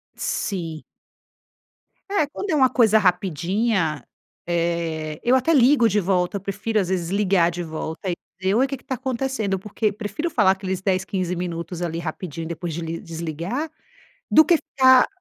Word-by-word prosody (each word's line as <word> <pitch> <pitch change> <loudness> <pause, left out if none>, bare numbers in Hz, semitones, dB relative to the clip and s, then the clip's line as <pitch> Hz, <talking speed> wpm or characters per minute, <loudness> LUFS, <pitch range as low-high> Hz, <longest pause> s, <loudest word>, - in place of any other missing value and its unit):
Sim. 165 -6 -3 1.3
É, 395 -6 +2
quando 390 +7 -6
é - - +2
uma 260 -3 +5
coisa 225 -4 +4
rapidinha, 180 - +1 0.4
eh, 165 -2 -1
eu 245 +2 +4
até 260 +6 +3
ligo 255 -3 +5
de 210 +1 +2
volta. 185 0 0
Eu - - -8
prefiro, 200 +3 -1
às 190 - 0
vezes, 175 -3 -1
ligar 190 -3 +2
de 175 +1 -5
volta 160 +3 -5
entendeu? 190 +4 -2
"Oi, 265 - +4
o - - -3
que 275 0 -4
que - - -23
tá 260 - -3
acontecendo?" 255 -5 -2
Porque 210 +2 -1
prefiro 210 - -4
falar 210 - +4
aqueles 190 -1 -3
10, 185 -1 +1
15 185 -2 -2
minutos, 175 0 -4
ali, 165 -1 -2
rapidinho 165 -1 -5
depois 170 0 -4
desli 165 +1 -4
desligar, 170 - -4 0.6
do 315 - +7
que 340 +3 +4
ficar 260 -4 +5
190 Hz, 165 wpm, -23 LUFS, 170-235 Hz, 1.3 s, do